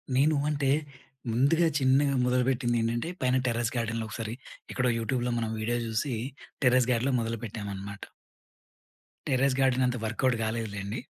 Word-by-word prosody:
నేను 150 +4 +4
అంటే 140 -2 0 0.6
ముందుగా 145 +8 +3
చిన్నగా 135 +1 +3
మొదలుపెట్టిందేంటంటే, 120 0 +1
పైన 130 0 +2
టెర్రస్ 120 -1 0
గార్డెన్‌లో 115 -1 -1
ఒకసారి 110 0 -4 0.4
ఎక్కడో 130 -1 +1
యూట్యూబ్‌లో 125 +1 -1
మనం 115 -1 -1
వీడియో 120 +2 0
జూసి 115 +5 -1 0.5
టెర్రస్ 125 -1 +4
గార్డ్‌లో 125 +3 +1
మొదలుపెట్టామనమాట. 105 -3 -5 1.2
టెర్రెస్ 130 0 +2
గార్డెన్ 130 -1 +3
అంత 125 0 -1
వర్కవుట్ 115 +3 +1
గాలేదులేండి. 110 -1 -3
120 Hz, 120 wpm, -28 LUFS, 115-130 Hz, 1.2 s, నేను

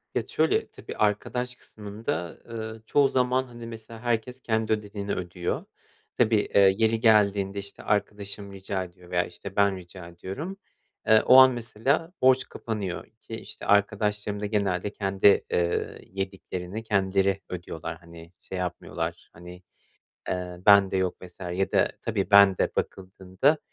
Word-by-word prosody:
Ya - - +1
şöyle: - - +1
Tabii, - - -9
arkadaş 125 +4 0
kısmında, 100 -7 -5
ııı, 110 -1 -6
çoğu 140 +2 +4
zaman, 130 0 +1
hani, 120 -2 -10
mesela, 115 0 -10
herkes 120 +2 -2
kendi 110 -1 0
ödediğini 105 -1 -3
ödüyor. 90 -1 -3 0.5
Tabii, 115 -2 +4 0.2
eee, 95 -1 +7
yeri 110 0 +2
geldiğinde, 100 -3 +3
işte, 100 0 -9
arkadaşım 100 -1 -2
rica 95 0 -3
ediyor 90 0 -14
veya, 90 0 +2
işte, 95 +2 -10
ben 100 -1 +3
rica 90 0 -11
ediyorum. 100 - -7 0.5
Eee, 110 -1 +7
o 130 - +8
an, 130 0 +9
mesela, 125 +8 -1
borç 130 0 +4
kapanıyor 105 -6 -4 0.2
ki, 115 - -7
işte, - - -9
arkadaşlarım 105 0 +1
da 105 - -3
genelde 100 -2 0
kendi, 100 0 +3
eee, 85 -1 0
yediklerini 95 +1 -5
kendileri 95 -1 +1
ödüyorlar, 85 -2 -6
hani, 85 0 -14
şey 95 - -7
yapmıyorlar, 85 -2 -4
hani, 90 +1 -12 0.7
eee, 90 -1 -3
bende 100 -2 +6
yok 95 -1 -1
vs. 90 +1 -13
ya 90 +2 -2
da - - +4
tabii, 105 -3 -1
ben 100 -2 +7
de - - +2
bakıldığında 95 +9 0
100 Hz, 145 wpm, -26 LUFS, 95-110 Hz, 0.7 s, an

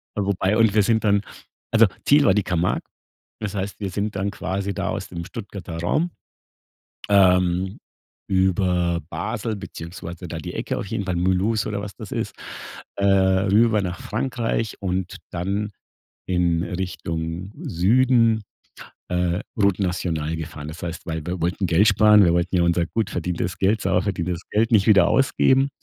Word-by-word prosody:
Wobei 100 0 +1
und 115 -3 +4
wir 105 - +5
sind 110 +1 +2
dann 100 -1 +3 0.5
also 115 0 +6 0.2
Ziel 145 0 +5
war 95 - +5
die 105 -2 +1
Camargue. 90 0 0 0.6
Das 105 -2 -4
heißt 100 0 -4
wir 100 -2 -3
sind 105 +2 -2
dann 100 +1 -1
quasi 100 0 -3
da - - -2
aus - - -4
dem 85 -1 -6
Stuttgarter 95 -4 -7
Raum, 155 - 0 1.0
ähm, 90 -1 +3 0.5
über 90 -2 +1
Basel 110 +7 -3
beziehungsweise 85 -1 -8
da 85 - -5
die 80 - -7
Ecke - - -3
auf - - -5
jeden 100 - -3
Fall, 90 -2 -2
Moulous 95 +5 +1
oder 100 -1 -2
was 100 -2 -7
das - - -9
ist. - - -3 0.6
Äh, 100 - -1
rüber 100 +3 +3
nach 90 -1 -4
Frankreich 115 -1 -2
und 95 -1 -2
dann 100 +4 -2 0.6
in 85 -2 +1
Richtung 85 0 -4
Süden, 115 +4 +3 0.7
äh, 90 +1 0 0.2
Route 100 -2 +2
National 80 -4 -1
gefahren. 75 -2 -7
Das 80 +2 -9
heißt 85 +1 -6
weil 80 -2 -4
wir 90 -1 -3
wollten 90 +3 0
Geld 90 +5 +4
sparen, 105 -2 +6
wir 85 - +4
wollten 85 +1 +1
ja 85 - +3
unser 85 0 +2
gut 110 -1 -2
verdientes 90 +1 -3
Geld, 100 +2 +2
sauber 95 -1 +2
verdientes 90 -3 -2
Geld 110 +2 +2
nicht 105 -2 +4
wieder 100 -5 +6
ausgeben 135 0 +3
95 Hz, 160 wpm, -23 LUFS, 90-105 Hz, 1.0 s, also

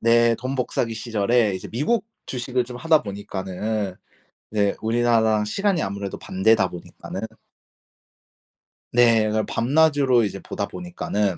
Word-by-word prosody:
네 115 0 +4
돈 130 +3 -4
복사기 125 -2 -1
시절에 110 -1 +1
이제 95 - -6
미국 210 - 0 0.2
주식을 125 0 -1
좀 125 0 -8
하다 160 +2 +3
보니까는 100 0 -4 0.6
이제 100 -2 +1
우리나라랑 110 -2 +2
시간이 195 - 0
아무래도 100 0 -4
반대다 95 +1 +2
보니까는 90 +2 -8 1.7
네. 115 -2 +5
그냥 110 0 0
밤낮으로 140 -1 +3
이제 100 -1 -3
보다 100 +1 -4
보니까는. 105 - -2
115 Hz, 305 characters per minute, -23 LUFS, 100-125 Hz, 1.7 s, 네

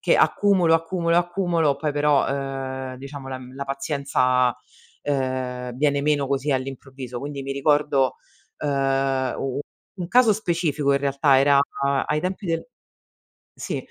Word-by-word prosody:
che - - +3
accumulo, 185 -5 +4
accumulo, 170 0 +1
accumulo, 175 -4 +1
poi 150 +1 -2
però, 145 -1 +3
ehm, 135 -1 -4
diciamo 140 0 -8
la 130 - -4
uhm, 130 0 -11
la 140 - -4
pazienza, 135 -3 +1 0.5
ehm, 130 -3 -2
viene 145 0 +2
meno 145 -2 +1
così 140 +1 0
all'improvviso. 130 -1 -5
Quindi 140 0 -5
mi 135 - -5
ricordo, 140 -1 +2 0.4
ehm, 135 -2 0
u 135 -1 -3
u - - -1 0.4
un 175 - -3
caso 240 -2 +5
specifico 165 -8 0
in 140 - +3
realtà: 140 0 +3
era 140 +1 +5 0.5
ai 150 0 0
tempi 190 +2 -3
del 165 -1 -1 0.9
sì, - - -4
140 Hz, 140 wpm, -23 LUFS, 135-155 Hz, 0.9 s, caso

